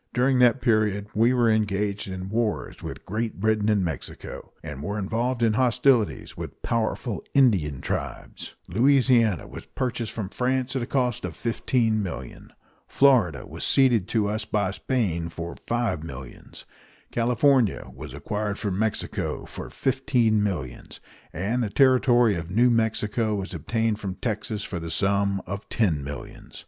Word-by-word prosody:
During 130 +1 +3
that 125 +1 +5
period 105 -4 +1
we 115 +3 +4
were 120 -2 +3
engaged 105 -2 0
in 95 0 -5
wars 110 0 -2
with - - -7
Great 110 +1 -3
Britain 110 0 +2
and 100 -4 +2
Mexico, 80 -3 -6
and 65 - -7
were 100 +7 -3
involved 115 +5 -1
in 110 -2 +3
hostilities 125 -1 +2
with - - -8
powerful 115 -1 -1
Indian 95 - +3
tribes; - - -5
Louisiana 120 - +3
was - - -10
purchased 120 -3 -3
from 105 -4 -4
France 130 +3 -1
at 130 - 0
a 120 - -3
cost 125 -4 0
of 90 -3 -5
$15,000,000; 110 - -1 0.4
Florida 115 - +3
was - - -7
ceded 120 -8 +4
to 110 -3 +1
us 110 +1 -1
by 100 -3 0
Spain 95 -8 -1
for 85 +1 -6
five 115 -9 0
millions; 65 -6 -10 0.5
California 120 - +2
was 70 -1 -9
acquired 105 +8 -3
from 100 -2 -2
Mexico 110 -1 -2
for - - -8
fifteen 125 -5 +1
millions, 85 -12 -4 0.3
and 105 +9 -1
the 110 - -1
territory 120 -1 +4
of 85 -2 -4
New 120 +6 +4
Mexico 110 -1 +1
was 100 0 -4
obtained 110 +6 -1
from 95 -3 -4
Texas 105 -2 -3
for 90 - -4
the 85 0 -6
sum 100 +2 +1
of 100 +3 -6
ten 85 -11 +1
millions. 70 +1 -8
110 Hz, 150 wpm, -25 LUFS, 95-120 Hz, 0.5 s, that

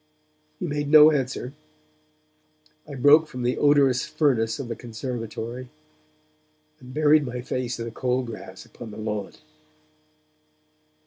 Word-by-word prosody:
He - - -3
made 145 -2 -3
no 155 0 +8
answer; 135 -2 -3 1.3
I 145 - -8
broke 145 +4 +5
from 125 -4 -6
the 125 +1 0
odorous 140 -3 +4
furnace 115 -7 0
of 140 -4 -6
the 115 - -4
conservatory, 120 +1 -6 1.1
and 125 - -13
buried 150 +1 +4
my 125 -2 -5
face 125 0 -3
in 115 - -5
the 115 - -6
cold 125 +2 -1
grass 105 -5 -9
upon 115 - -11
the 105 - -10
lawn. 105 -2 -4
125 Hz, 130 wpm, -24 LUFS, 115-145 Hz, 1.3 s, no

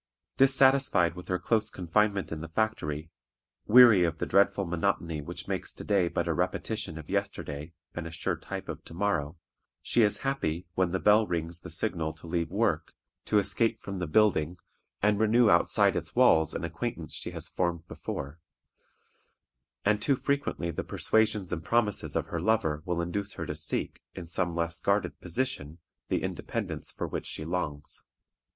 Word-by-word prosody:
Dissatisfied 135 -9 +4
with 90 0 -10
her 90 - 0
close 110 +4 +1
confinement 100 +2 0
in 80 -1 -4
the 80 - -6
factory, 80 -6 -2 0.6
weary 115 -5 +8
of 85 -2 0
the - - -2
dreadful 100 0 +3
monotony 85 -2 -1
which 70 - -7
makes - - -3
to - - -7
day 100 -4 +2
but - - -2
a - - +1
repetition 100 -7 -2
of 80 - -9
yesterday 75 +2 -3 0.2
and 85 -1 -5
a - - -6
sure 80 - -2
type - - -7
of - - -6
to 80 - -11
morrow, 85 -5 -1 0.4
she 120 - +1
is 105 -2 +3
happy, 90 - -1
when 95 -1 +1
the 95 - 0
bell 105 +2 +4
rings 85 0 -3
the 90 - -10
signal 80 -2 -1
to 80 - -14
leave 85 -1 -1
work, 100 -4 0 0.3
to 105 - +2
escape 115 +3 +2
from 100 -1 -6
the 90 - -2
building, 90 -3 +2 0.5
and 105 0 +3
renew 110 +1 +5
outside 85 - +4
its - - -4
walls 80 -1 +4
an - - -3
acquaintance 85 0 -4
she - - -4
has - - -6
formed 85 -2 -2
before; 70 +1 -6 1.5
and 105 0 +3
too 140 +4 +3
frequently 140 -11 -1
the - - -4
persuasions 110 -4 +1
and 80 -2 -3
promises 105 +3 0
of - - 0
her - - -4
lover 105 -9 +1
will 90 -1 0
induce 100 +4 -2
her 85 - -5
to 75 - -3
seek, 75 0 -3
in 90 - -6
some 85 0 -1
less 85 -1 -1
guarded 100 +1 0
position, 90 - -3 0.3
the - - 0
independence - - -3
for - - -4
which - - -4
she 75 - -5
longs. 80 -4 -4
90 Hz, 175 wpm, -29 LUFS, 80-105 Hz, 1.5 s, weary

